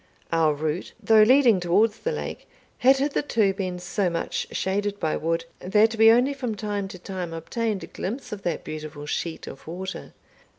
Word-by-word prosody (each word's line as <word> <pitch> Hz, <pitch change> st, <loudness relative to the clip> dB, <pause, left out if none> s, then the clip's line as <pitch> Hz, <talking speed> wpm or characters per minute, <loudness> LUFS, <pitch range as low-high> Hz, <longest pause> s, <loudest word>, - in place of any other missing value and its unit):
Our 160 Hz, -2 st, +3 dB
route, 155 Hz, +4 st, -3 dB
though 220 Hz, -1 st, +5 dB
leading 240 Hz, -2 st, +6 dB
towards 200 Hz, +5 st, +2 dB
the 485 Hz, -, -2 dB
lake, 465 Hz, -, -6 dB, 0.3 s
had 265 Hz, +2 st, +6 dB
hitherto 265 Hz, -7 st, +1 dB
been 185 Hz, -2 st, -3 dB
so 180 Hz, +1 st, -1 dB
much 170 Hz, -1 st, -3 dB
shaded 205 Hz, +1 st, -1 dB
by 155 Hz, -, 0 dB
wood, 165 Hz, +1 st, -1 dB
that 210 Hz, +4 st, +3 dB
we 225 Hz, 0 st, +7 dB
only 245 Hz, +5 st, +4 dB
from 250 Hz, -5 st, -3 dB
time 205 Hz, -1 st, -3 dB
to 190 Hz, -, -9 dB
time 180 Hz, -2 st, -5 dB
obtained 205 Hz, +5 st, -2 dB
a -, -, -4 dB
glimpse 235 Hz, +6 st, -6 dB
of 210 Hz, -2 st, -5 dB
that 175 Hz, -, -2 dB
beautiful 155 Hz, -1 st, -7 dB
sheet 160 Hz, +2 st, -3 dB
of 135 Hz, -, -11 dB
water. 185 Hz, +3 st, -6 dB
195 Hz, 175 wpm, -25 LUFS, 170-225 Hz, 0.3 s, we